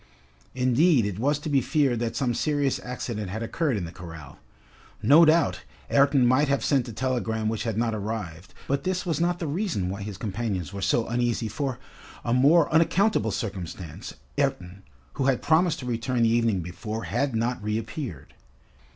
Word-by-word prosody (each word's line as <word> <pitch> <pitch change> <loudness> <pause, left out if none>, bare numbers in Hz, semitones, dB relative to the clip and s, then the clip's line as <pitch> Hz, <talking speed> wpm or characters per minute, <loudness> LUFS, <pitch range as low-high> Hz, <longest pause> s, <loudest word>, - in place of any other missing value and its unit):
Indeed, 130 - +3
it 100 -1 -3
was 145 +4 +2
to 150 - -7
be 140 -3 +3
feared 135 -3 +1
that 115 -1 -2
some 125 -3 0
serious 145 +2 0
accident 120 -5 -4
had 110 +4 -4
occurred 140 +1 -1
in 90 - -3
the 85 - -8
corral. 80 -6 -10 0.6
No 155 +5 +7
doubt, 160 0 +3 0.3
Ayrton 140 -2 +4
might 130 +4 +4
have 140 0 0
sent 135 -3 +2
a - - -6
telegram 115 -2 -1
which 110 +1 -3
had 115 -2 -2
not 115 -1 +1
arrived, 100 -5 -5
but 140 +1 0
this 185 -1 -1
was 165 -2 -1
not 175 0 +1
the 175 - -4
reason 155 - -1
why 100 +1 -5
his 100 -2 -6
companions 100 -4 -3
were 100 - -5
so 110 +4 +2
uneasy, 120 -1 0
for, 125 +4 -3 0.5
a 120 - +1
more 145 +6 +5
unaccountable 190 +6 +3
circumstance, 95 - -6 0.2
Ayrton, 90 +2 -1 0.3
who 135 - -1
had 135 -3 +1
promised 165 +1 +3
to - - -7
return 120 0 0
the 115 - +4
evening 115 -5 +2
before, 105 +6 -5
had 130 +1 -1
not 115 +2 -1
reappeared. 105 - -4
120 Hz, 175 wpm, -26 LUFS, 105-140 Hz, 0.6 s, No